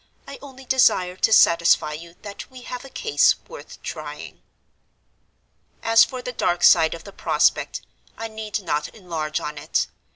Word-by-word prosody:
I -, -, -9 dB
only 270 Hz, -2 st, -12 dB
desire 185 Hz, -8 st, +3 dB
to 220 Hz, -, +2 dB
satisfy 170 Hz, -6 st, +4 dB
you 170 Hz, +2 st, -10 dB
that 205 Hz, -1 st, -9 dB
we 255 Hz, -1 st, -13 dB
have 250 Hz, 0 st, -7 dB
a 270 Hz, -, -11 dB
case 445 Hz, -, +2 dB
worth -, -, -12 dB
trying. -, -, -8 dB, 1.4 s
"As 225 Hz, 0 st, +6 dB
for 255 Hz, -1 st, -5 dB
the 250 Hz, -, -5 dB
dark 175 Hz, -6 st, -1 dB
side 165 Hz, -1 st, +5 dB
of 165 Hz, -, -12 dB
the 200 Hz, -, -12 dB
prospect, -, -, 0 dB, 0.3 s
I 225 Hz, -, -5 dB
need 220 Hz, -1 st, -5 dB
not 150 Hz, -3 st, -1 dB
enlarge 165 Hz, -7 st, -4 dB
on 150 Hz, -1 st, -6 dB
it. -, -, 0 dB
200 Hz, 160 wpm, -22 LUFS, 170-250 Hz, 1.4 s, As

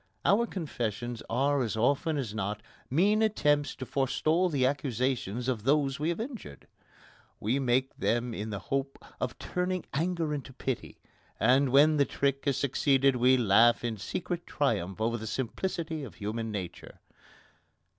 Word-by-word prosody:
Our 230 Hz, +4 st, +4 dB
confessions 120 Hz, -, -4 dB
are 140 Hz, +4 st, +2 dB
as 110 Hz, -3 st, -2 dB
often 145 Hz, +6 st, +1 dB
as 120 Hz, -7 st, -3 dB
not 105 Hz, 0 st, -3 dB, 0.3 s
mean 200 Hz, -, +3 dB
attempts 145 Hz, -9 st, +2 dB
to 130 Hz, -, -6 dB
forestall 155 Hz, +7 st, +1 dB
the 140 Hz, -5 st, +1 dB
accusations 130 Hz, -4 st, -1 dB
of 125 Hz, -5 st, 0 dB
those 140 Hz, +1 st, +2 dB
we 155 Hz, +2 st, 0 dB
have 170 Hz, -, -2 dB
injured. 225 Hz, -, -7 dB, 0.7 s
We 120 Hz, +7 st, 0 dB
make 130 Hz, 0 st, +1 dB
them 120 Hz, +1 st, 0 dB
in 110 Hz, 0 st, -4 dB
the 105 Hz, -, -3 dB, 0.2 s
hope 135 Hz, 0 st, -1 dB, 0.2 s
of -, -, -3 dB
turning 180 Hz, 0 st, -2 dB
anger 165 Hz, 0 st, 0 dB
into 140 Hz, -2 st, -6 dB
pity, 130 Hz, -1 st, -4 dB, 0.4 s
and 130 Hz, +4 st, +4 dB
when 150 Hz, +4 st, +5 dB
the 140 Hz, -, +4 dB
trick 140 Hz, 0 st, -1 dB
has 140 Hz, -3 st, +1 dB
succeeded 135 Hz, -1 st, +2 dB
we 130 Hz, +2 st, +5 dB
laugh 115 Hz, +1 st, +5 dB
in 115 Hz, -2 st, -2 dB
secret 175 Hz, -, -4 dB
triumph 105 Hz, -9 st, -1 dB
over 115 Hz, +2 st, 0 dB
the 110 Hz, 0 st, -6 dB
simplicity 160 Hz, -, -3 dB
of 125 Hz, -, -9 dB
human 110 Hz, +2 st, -4 dB
nature. 95 Hz, -5 st, -7 dB
135 Hz, 155 wpm, -29 LUFS, 115-150 Hz, 0.7 s, when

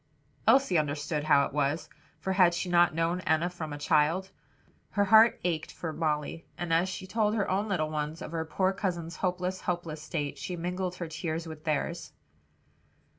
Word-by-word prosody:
Elsie 265 Hz, -11 st, +5 dB
understood 150 Hz, +1 st, -2 dB
how 145 Hz, -2 st, +5 dB
it -, -, -7 dB
was; 145 Hz, +2 st, 0 dB, 0.3 s
for 190 Hz, -, -1 dB
had 180 Hz, -2 st, +5 dB
she 180 Hz, +1 st, -2 dB
not 175 Hz, -2 st, +4 dB
known 165 Hz, +2 st, +1 dB
Enna 160 Hz, +2 st, +1 dB
from 160 Hz, -3 st, -6 dB
a 145 Hz, -, -4 dB
child? 160 Hz, +5 st, +2 dB, 0.6 s
Her 205 Hz, -1 st, +1 dB
heart 220 Hz, +3 st, +6 dB
ached 165 Hz, -3 st, -1 dB
for 160 Hz, -2 st, -5 dB
Molly, 155 Hz, 0 st, -2 dB
and 175 Hz, -2 st, -2 dB
as 170 Hz, +3 st, +3 dB
she 185 Hz, 0 st, -6 dB
told 215 Hz, +2 st, +1 dB
her 205 Hz, -3 st, 0 dB
own 200 Hz, +3 st, 0 dB
little 155 Hz, -5 st, 0 dB
ones 155 Hz, +1 st, -3 dB
of -, -, -7 dB
their 165 Hz, -1 st, -1 dB
poor 185 Hz, +5 st, +1 dB
cousin's 175 Hz, -4 st, -3 dB
hopeless, 180 Hz, 0 st, -1 dB
helpless 170 Hz, -4 st, -3 dB
state, 150 Hz, -2 st, -4 dB
she 180 Hz, -, -4 dB
mingled 180 Hz, +1 st, -3 dB
her 175 Hz, -2 st, -5 dB
tears 160 Hz, +1 st, -3 dB
with 155 Hz, -1 st, -9 dB
theirs. 160 Hz, +2 st, -2 dB
170 Hz, 180 wpm, -29 LUFS, 155-185 Hz, 0.6 s, heart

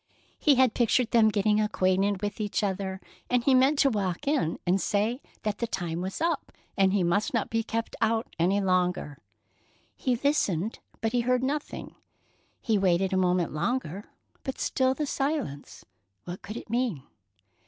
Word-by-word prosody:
He 295 Hz, -3 st, +5 dB
had 255 Hz, -2 st, +4 dB
pictured 240 Hz, 0 st, +2 dB
them 225 Hz, -2 st, +5 dB
getting 210 Hz, 0 st, +2 dB
acquainted 195 Hz, -1 st, +1 dB
with 205 Hz, +1 st, -3 dB
each 210 Hz, +1 st, -1 dB
other, 190 Hz, -1 st, -2 dB, 0.3 s
and 245 Hz, -1 st, +2 dB
he 270 Hz, -, +4 dB
meant 265 Hz, +3 st, +4 dB
to 275 Hz, -, +5 dB
walk 200 Hz, -, -2 dB
in 280 Hz, -, +1 dB
and 185 Hz, +2 st, +2 dB
say 220 Hz, +6 st, 0 dB, 0.2 s
that 210 Hz, -1 st, -2 dB
the 235 Hz, -, -1 dB
time 175 Hz, -5 st, -3 dB
was 190 Hz, +1 st, -4 dB
up 330 Hz, -3 st, -1 dB, 0.2 s
and 195 Hz, -1 st, +3 dB
he 195 Hz, -2 st, +2 dB
must 200 Hz, +8 st, +1 dB
not 225 Hz, -, -1 dB
be 225 Hz, 0 st, +1 dB
kept 225 Hz, 0 st, -3 dB
out 225 Hz, 0 st, +1 dB
any 185 Hz, +4 st, +3 dB
longer. 180 Hz, -6 st, 0 dB, 0.8 s
He 255 Hz, -3 st, 0 dB
listened, 225 Hz, -, 0 dB, 0.2 s
but 225 Hz, -, 0 dB
he 245 Hz, 0 st, +2 dB
heard 250 Hz, +1 st, +1 dB
nothing. 290 Hz, +3 st, -3 dB, 0.7 s
He 220 Hz, -4 st, +1 dB
waited 190 Hz, 0 st, +2 dB
a -, -, +2 dB
moment 180 Hz, -3 st, +1 dB
longer, 200 Hz, +2 st, -2 dB, 0.4 s
but 265 Hz, -, -4 dB
still 260 Hz, 0 st, +1 dB
the 300 Hz, -, -1 dB
silence. 270 Hz, -, -3 dB, 0.4 s
What 175 Hz, +7 st, -7 dB
could 210 Hz, +3 st, -7 dB
it -, -, -8 dB
mean? 235 Hz, -, 0 dB
210 Hz, 170 wpm, -27 LUFS, 185-250 Hz, 0.8 s, He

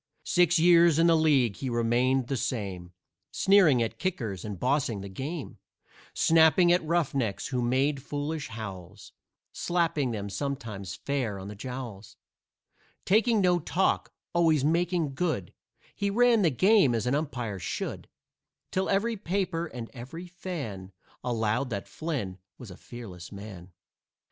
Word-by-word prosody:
Six 175 Hz, -1 st, +3 dB
years 170 Hz, -1 st, +6 dB
in 165 Hz, -, +4 dB
the 165 Hz, -1 st, +5 dB
league 140 Hz, -9 st, +3 dB
he 135 Hz, -, -3 dB
remained 120 Hz, +2 st, +2 dB
the 135 Hz, -, -2 dB
same, 100 Hz, -9 st, -3 dB, 0.4 s
Sneering 185 Hz, -11 st, +4 dB
at 115 Hz, -, -5 dB
kickers 115 Hz, -, -3 dB
and 105 Hz, -4 st, -6 dB
bossing 125 Hz, -, 0 dB
the 100 Hz, -, -7 dB
game, 140 Hz, -, -6 dB, 0.6 s
Snapping 165 Hz, +2 st, +5 dB
at 175 Hz, -1 st, +3 dB
roughnecks 140 Hz, -, -1 dB
who 125 Hz, -2 st, -1 dB
made 135 Hz, +4 st, +1 dB
foolish 145 Hz, +2 st, -4 dB
howls, 100 Hz, -3 st, -8 dB, 0.4 s
Slapping 165 Hz, -6 st, 0 dB
them, 105 Hz, -3 st, -4 dB
sometimes, 105 Hz, -5 st, -4 dB
fair 125 Hz, -7 st, -2 dB
on 95 Hz, +1 st, -7 dB
the 105 Hz, -, -8 dB
jowls; 120 Hz, -3 st, -7 dB, 0.9 s
Taking 220 Hz, +2 st, +3 dB
no 180 Hz, -1 st, +3 dB
talk, 180 Hz, +4 st, 0 dB, 0.2 s
always 160 Hz, -5 st, +3 dB
making 170 Hz, -2 st, +1 dB
good, 140 Hz, -, -2 dB, 0.4 s
He 200 Hz, -, -1 dB
ran 235 Hz, +1 st, +4 dB
the 175 Hz, -, +4 dB
game 185 Hz, -, +4 dB
as 115 Hz, -, -1 dB
an 125 Hz, -, +1 dB
umpire 125 Hz, -9 st, -2 dB
should, 85 Hz, -, -4 dB, 0.6 s
Till 190 Hz, 0 st, 0 dB
every 220 Hz, +4 st, +1 dB
paper 185 Hz, -3 st, -2 dB
and 120 Hz, -6 st, -7 dB
every 135 Hz, +8 st, -8 dB
fan 145 Hz, -, -6 dB, 0.3 s
Allowed 120 Hz, +1 st, 0 dB
that 100 Hz, -4 st, -4 dB
Flynn 130 Hz, -, -4 dB, 0.2 s
was 120 Hz, -6 st, -10 dB
a -, -, -9 dB
fearless 95 Hz, -8 st, -10 dB
man. 100 Hz, -3 st, -10 dB
135 Hz, 140 wpm, -28 LUFS, 110-170 Hz, 0.9 s, years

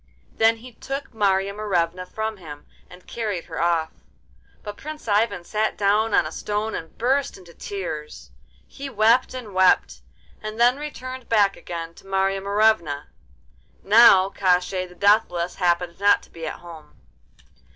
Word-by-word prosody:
Then 225 Hz, +1 st, +3 dB
he 250 Hz, +3 st, -12 dB
took 270 Hz, +3 st, -6 dB
Marya 200 Hz, -2 st, +1 dB
Morevna 180 Hz, -4 st, -1 dB
from 220 Hz, +1 st, -4 dB
him, 150 Hz, -5 st, -11 dB, 0.2 s
and 180 Hz, 0 st, -15 dB
carried 210 Hz, -7 st, -4 dB
her -, -, -5 dB
off. 165 Hz, -2 st, +1 dB, 0.7 s
But 205 Hz, 0 st, -7 dB
Prince 305 Hz, 0 st, -9 dB
Ivan 205 Hz, -3 st, +1 dB
sat 215 Hz, +4 st, -1 dB
down 210 Hz, +2 st, +2 dB
on -, -, +3 dB
a 155 Hz, -, -5 dB
stone 210 Hz, +4 st, -3 dB
and 165 Hz, -, -7 dB
burst 270 Hz, +4 st, 0 dB
into 175 Hz, -3 st, -15 dB
tears. 155 Hz, -, -7 dB, 0.3 s
He 275 Hz, 0 st, -8 dB
wept 235 Hz, +2 st, +3 dB
and 230 Hz, -6 st, -8 dB
wept—and 185 Hz, -, -1 dB
then 245 Hz, +2 st, +4 dB
returned 260 Hz, -4 st, -7 dB
back 205 Hz, -3 st, +3 dB
again 165 Hz, -1 st, -7 dB
to 195 Hz, -, -17 dB
Marya 195 Hz, 0 st, 0 dB
Morevna. 200 Hz, -8 st, +1 dB, 0.7 s
Now 195 Hz, -3 st, +6 dB
Koshchei 185 Hz, 0 st, +1 dB
the 180 Hz, -, -16 dB
Deathless 190 Hz, -4 st, +2 dB
happened 175 Hz, -1 st, 0 dB
not 205 Hz, 0 st, +4 dB
to -, -, -19 dB
be 165 Hz, -1 st, -7 dB
at -, -, -7 dB
home. 165 Hz, -3 st, -13 dB
200 Hz, 150 wpm, -23 LUFS, 175-220 Hz, 0.7 s, Now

